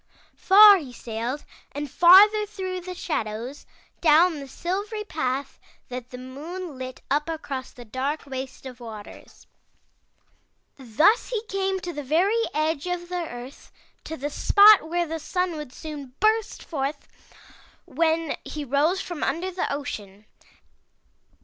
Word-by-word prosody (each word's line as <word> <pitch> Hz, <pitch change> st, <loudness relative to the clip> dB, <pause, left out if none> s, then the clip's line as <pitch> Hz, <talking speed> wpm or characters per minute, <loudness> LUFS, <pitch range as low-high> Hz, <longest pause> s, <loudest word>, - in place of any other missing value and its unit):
Far 410 Hz, +1 st, +8 dB
he 290 Hz, -8 st, -8 dB
sailed 240 Hz, +4 st, -5 dB, 0.3 s
and 290 Hz, +1 st, -4 dB
farther 405 Hz, +8 st, +7 dB
through 375 Hz, -3 st, -5 dB
the 365 Hz, +1 st, -7 dB
shadows, 235 Hz, -5 st, -4 dB, 0.3 s
down 320 Hz, 0 st, +4 dB
the 275 Hz, -, -8 dB
silvery 405 Hz, -, -4 dB
path 275 Hz, -8 st, -3 dB, 0.3 s
that 250 Hz, -1 st, -7 dB
the 250 Hz, -, -9 dB
moon 300 Hz, +6 st, -7 dB
lit 255 Hz, 0 st, -7 dB
up 295 Hz, +3 st, +1 dB
across 290 Hz, -5 st, -5 dB
the 245 Hz, -, -13 dB
dark 265 Hz, +7 st, -3 dB
waste 265 Hz, -1 st, -7 dB
of 255 Hz, -1 st, -9 dB
the -, -, -11 dB
waters. 215 Hz, -3 st, -11 dB, 1.3 s
Thus 285 Hz, -, +2 dB
he 455 Hz, -3 st, -2 dB
came 385 Hz, -1 st, -1 dB
to 350 Hz, -1 st, -5 dB
the 295 Hz, -, -5 dB
very 375 Hz, -, +2 dB
edge 310 Hz, +1 st, -1 dB
of 355 Hz, -1 st, -4 dB
the 355 Hz, -2 st, -3 dB
earth, 245 Hz, +3 st, -10 dB, 0.3 s
to 320 Hz, -, -6 dB
the 290 Hz, +3 st, -4 dB
spot 405 Hz, 0 st, +6 dB
where 345 Hz, +1 st, 0 dB
the 325 Hz, 0 st, -5 dB
Sun 360 Hz, +3 st, -1 dB
would 300 Hz, -4 st, -7 dB
soon 285 Hz, -4 st, -9 dB
burst 435 Hz, +1 st, +1 dB
forth 285 Hz, -2 st, -4 dB, 0.8 s
when 325 Hz, -1 st, 0 dB
he 300 Hz, -1 st, -6 dB
rose 300 Hz, +8 st, +1 dB
from 350 Hz, -4 st, -6 dB
under 335 Hz, +7 st, -1 dB
the 360 Hz, -, -2 dB
ocean. 210 Hz, -8 st, -6 dB
310 Hz, 145 wpm, -25 LUFS, 265-365 Hz, 1.3 s, Far